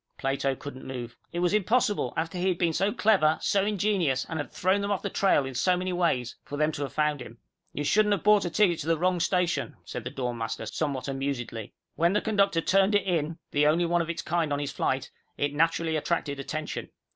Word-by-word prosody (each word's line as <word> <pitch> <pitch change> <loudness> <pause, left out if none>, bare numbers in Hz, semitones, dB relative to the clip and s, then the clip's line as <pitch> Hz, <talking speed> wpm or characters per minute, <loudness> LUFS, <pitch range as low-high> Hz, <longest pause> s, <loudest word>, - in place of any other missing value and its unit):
Plato 135 0 0
couldn't 130 -1 -9
move. 120 -2 -6 0.2
It 175 - -2
was 180 +2 +2
impossible, 210 - +2
after 165 +3 -2
he 185 - 0
had 180 -2 +1
been 170 -2 +1
so 195 +5 +1
clever, 190 -9 +3
so 195 -1 +2
ingenious, 190 -10 +1
and 160 - -4
had 145 -4 -5
thrown 190 +3 +1
them 200 - -2
off 200 -2 -1
the - - -3
trail 190 -8 +3
in 135 - -5
so 180 +9 +2
many 185 0 -2
ways, 130 -9 0
for 145 - -6
them 150 +1 +2
to 145 - -6
have 140 - -3
found 150 -2 0
him! 115 -1 -10 0.3
"You 145 - -3
shouldn't 210 +7 +3
have 200 - -2
bought 210 0 +5
a 175 - -1
ticket 175 -2 +2
to 150 - -5
the 165 -1 +2
wrong 180 +2 +1
station," 180 0 0
said - - -6
the - - -4
dorm 125 -2 -4
master, 115 0 -3
somewhat 140 +3 -3
amusedly. 135 -5 -4 0.2
"When 170 +3 +3
the 210 - +3
conductor 200 -5 +2
turned 195 +4 +3
it 205 -2 +2
in, 165 -3 -1
the 145 +1 +3
only 165 +3 +3
one 175 0 +2
of 170 - -4
its 170 - -3
kind 165 -2 0
on 145 - +1
his 145 -1 -3
flight, 130 0 -1 0.3
it 145 0 0
naturally 165 +1 +1
attracted 150 -2 -1
attention. 155 +3 -4
165 Hz, 230 wpm, -27 LUFS, 140-185 Hz, 0.3 s, bought